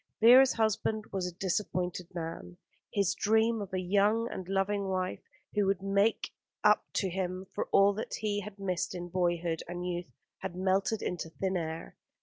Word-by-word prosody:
Vera's 250 +4 +8
husband 220 -1 0
was 190 -2 -1
a - - -4
disappointed 180 -2 -1
man. 160 - -6 0.3
His 200 -3 +2
dream 220 +1 +2
of 200 - -6
a 185 - -1
young 205 +5 +2
and 185 - -6
loving 195 +1 0
wife 185 -1 -2 0.3
who 205 -2 +2
would 195 -1 0
make 200 +3 +1 0.3
up - - +5
to 195 - +1
him 185 0 -3
for - - -1
all 200 +1 +6
that 215 +3 -4
he 210 -1 -1
had 205 0 -9
missed 185 -2 -2
in 175 0 -5
boyhood 175 -2 0
and 175 +1 -5
youth 175 -1 -4 0.3
had 190 -2 -5
melted 190 +3 +1
into 175 -2 -3
thin 190 +3 -2
air. 165 -1 -4
190 Hz, 170 wpm, -31 LUFS, 180-205 Hz, 0.3 s, Vera's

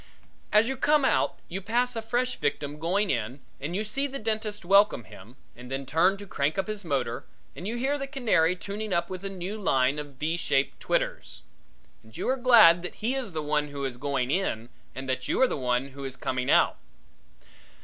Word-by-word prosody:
As 210 +2 +5
you 265 0 -2
come 295 +1 +3
out - - +2
you 190 +3 -5
pass 240 +4 0
a 225 - -2
fresh 245 +3 -1
victim 145 0 -2
going 190 +5 +1
in 120 +2 -2 0.2
and 155 +6 -4
you 210 - 0
see 275 +7 -1
the 275 0 -6
dentist 215 -3 -3
welcome 200 - +4
him 110 +4 -14 0.2
and 125 +1 -11
then 135 +1 -3
turn 180 +8 +3
to 205 - -9
crank 145 -2 -1
up 195 - +1
his 215 -1 -5
motor 135 -7 -2 0.3
and 180 - -6
you 235 +2 -2
hear 275 +4 0
the 275 - -3
canary 220 - +2
tuning 205 +2 -5
up 170 +1 0
with 185 0 -6
a 195 - -3
new 195 +3 -5
line 135 -4 +2
of 145 -2 -8
v 155 +5 -1
shaped 135 -4 0
twitters. - - -2 0.6
And 110 0 -15
you - - -3
are 260 - +3
glad 230 -10 +7
that 180 - -6
he 230 +4 -1
is 255 -9 -3
the 155 -1 -2
one 150 0 0
who 140 -1 -5
is 125 -2 -4
going 135 -1 -1
in 120 - -1 0.3
and 135 0 -6
that 130 0 -2
you - - 0
are 260 - +6
the - - -2
one 125 0 0
who 140 +1 -9
is 135 -1 -5
coming 130 0 -2
out. - - +4
175 Hz, 215 wpm, -27 LUFS, 140-215 Hz, 0.6 s, glad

